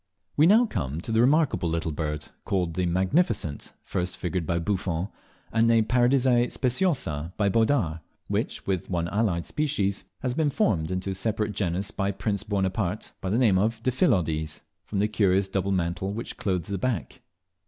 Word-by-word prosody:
We 150 +3 +5
now 220 +6 +6
come 75 - -3
to 115 - -5
the 110 0 +4
remarkable 130 - +3
little 80 0 -1
bird 75 -1 -3
called 90 -4 -1
the 90 +2 0
"Magnificent," 95 - 0
first 90 0 -2
figured 85 -2 -2
by 85 - +1
Buffon, 90 0 -1 0.4
and 115 0 +4
named 115 -1 +3
Paradisea 125 0 +3
speciosa 125 - 0
by 100 -1 +2
Boddaert, 110 - +2 0.3
which, - - -2
with 95 -3 -2
one 85 -2 -1
allied 100 -5 0
species, 135 -11 -1 0.2
has 125 -2 -1
been 150 +2 +1
formed 85 - +1
into 95 +1 -2
a - - -2
separate 105 +2 -1
genus 100 0 -2
by 100 -1 -1
Prince 100 0 -2
Buonaparte, 100 -1 -2
under 95 +4 0
the - - +2
name 105 -7 +4
of 110 +3 0
Diphyllodes, 90 - +1 0.2
from 105 - -4
the 100 +2 +3
curious 100 -3 +2
double 95 0 -1
mantle 90 +1 -1
which 115 +4 -5
clothes 90 -4 -2
the 100 -2 -2
back. 100 - -2
100 Hz, 170 wpm, -26 LUFS, 90-115 Hz, 0.4 s, now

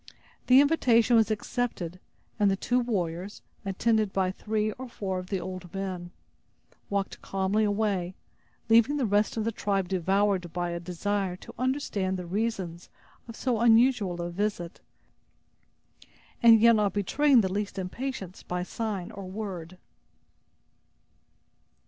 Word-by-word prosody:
The 255 +1 +8
invitation 245 -6 +4
was 225 -1 +4
accepted; 215 -5 -3 0.4
and 205 -1 +4
the 195 - +2
two 245 +5 0
warriors, 190 -5 -3 0.2
attended 215 +1 +1
by 190 -1 0
three 215 +2 -1
or 255 +4 -8
four 190 -5 -3
of 185 - -8
the 195 -1 -2
old 185 -1 -7
men, 185 -2 -4 0.8
walked 200 -1 -2
calmly 195 +2 0
away, 200 -4 -1 0.5
leaving 230 +6 +5
the 270 - +1
rest 210 +1 +1
of 220 - 0
the 230 - 0
tribe 195 -4 -1
devoured 190 -1 +1
by 175 0 -2
a 170 - -3
desire 185 +2 -2
to - - -12
understand 245 -8 -1
the 180 - -6
reasons 185 -3 -3 0.4
of 230 - -9
so 245 -4 -1
unusual 225 -5 +4
a 175 - -4
visit, 180 -2 -3 1.6
and 230 -2 +8
yet 230 0 +6
not 205 -3 +1
betraying 255 +6 +3
the 190 -2 -2
least 205 0 -3
impatience 190 0 -5
by 180 0 -3
sign 200 -2 -4
or 195 -1 -8
word. 185 -4 -6
200 Hz, 135 wpm, -28 LUFS, 185-225 Hz, 1.6 s, The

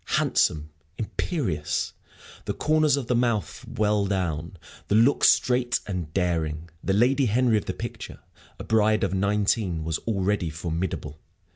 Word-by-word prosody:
Handsome, 75 -1 +1 0.3
imperious, 115 - -2 0.5
the - - -3
corners 155 -2 +2
of 140 - -3
the 125 - 0
mouth 120 0 -1
well 105 -4 +1
down, 90 -3 -2 0.3
the 100 - +1
look 115 +6 +4
straight 125 -1 +3
and 90 -6 -4
daring 85 -3 -1
the - - 0
Lady 125 +6 +3
Henry 120 +1 +2
of 105 - -3
the - - -3
picture, - - -7 0.4
a - - -7
bride 110 -1 +2
of 95 -1 0
nineteen, 100 -3 0
was 80 0 -2
already 100 -4 -1
formidable. 80 -2 -4
100 Hz, 140 wpm, -25 LUFS, 85-120 Hz, 0.5 s, look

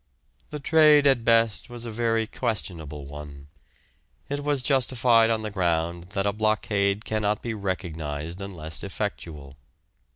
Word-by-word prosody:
The 150 - -5
trade 150 0 +5
at 135 -4 +4
best 115 -5 +2
was 120 -1 -8
a 115 - -5
very 115 0 +1
questionable 80 -10 -4
one; 70 0 -10 0.8
it 145 0 -3
was 145 -3 0
justified 125 -4 +3
on 110 -1 0
the 110 - -4
ground 85 -2 -1
that 95 0 0
a 100 - +1
blockade 105 -1 0
cannot 105 -1 -1
be 120 - -2
recognised 85 -4 -4
unless 80 -7 -6
effectual. 70 -4 -5
105 Hz, 135 wpm, -26 LUFS, 85-115 Hz, 0.8 s, trade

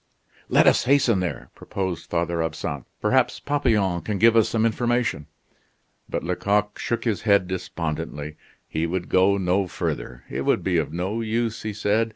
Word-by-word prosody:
"Let - - +5
us - - +4
hasten 130 -6 +4
there!" 85 -7 -4
proposed 95 -3 -4
Father 85 0 0
Absinthe; 80 -4 -4
"perhaps - - +2
Papillon 105 -11 +1
can 105 +5 -2
give 115 +3 +5
us 115 -1 +4
some 115 -1 +1
information." 120 - 0 0.8
But - - -2
Lecoq 105 +4 0
shook 120 - -2
his 110 -5 -1
head 100 -4 +3
despondently. 80 -4 -4 0.3
He 80 +1 -1
would 90 +1 -3
go 95 +2 +4
no 95 +1 +1
further. 60 -7 -4
"It - - -4
would - - +1
be 90 -2 +1
of 75 - -2
no 95 +7 -2
use," 115 0 -1
he 110 - -3
said. 110 +2 +1
95 Hz, 165 wpm, -24 LUFS, 85-110 Hz, 0.8 s, Let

